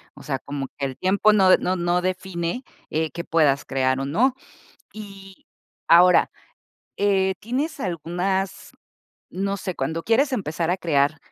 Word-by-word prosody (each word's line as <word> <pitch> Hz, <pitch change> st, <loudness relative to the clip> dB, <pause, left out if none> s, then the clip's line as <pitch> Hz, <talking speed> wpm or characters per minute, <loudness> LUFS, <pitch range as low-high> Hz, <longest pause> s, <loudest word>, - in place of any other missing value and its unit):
o -, -, -13 dB
sea, 135 Hz, -1 st, -3 dB
como 140 Hz, -1 st, -6 dB
que 140 Hz, -, -3 dB
el 130 Hz, -, -8 dB
tiempo 200 Hz, +3 st, +3 dB
no 190 Hz, -3 st, +5 dB
de -, -, +6 dB
no 185 Hz, -, -1 dB
no 175 Hz, 0 st, 0 dB
define, 185 Hz, +3 st, -3 dB, 0.3 s
eh, 160 Hz, 0 st, -1 dB
qué 170 Hz, -, -6 dB
puedas 150 Hz, -4 st, +2 dB
crear 130 Hz, -1 st, 0 dB
o 135 Hz, -, -2 dB
no. 235 Hz, -, +2 dB, 0.6 s
Y 195 Hz, -2 st, -11 dB, 0.4 s
ahora, 180 Hz, +2 st, +6 dB, 0.7 s
eh, 190 Hz, -2 st, +2 dB
¿tienes 270 Hz, +8 st, -3 dB
algunas? 185 Hz, -, -3 dB, 0.6 s
No 195 Hz, +2 st, -2 dB
sé, 185 Hz, -2 st, -5 dB
cuando 165 Hz, +1 st, -2 dB
quieres 265 Hz, -, +2 dB
empezar 170 Hz, -6 st, -1 dB
a -, -, 0 dB
crear, 155 Hz, -3 st, +1 dB
180 Hz, 155 wpm, -23 LUFS, 160-195 Hz, 0.7 s, de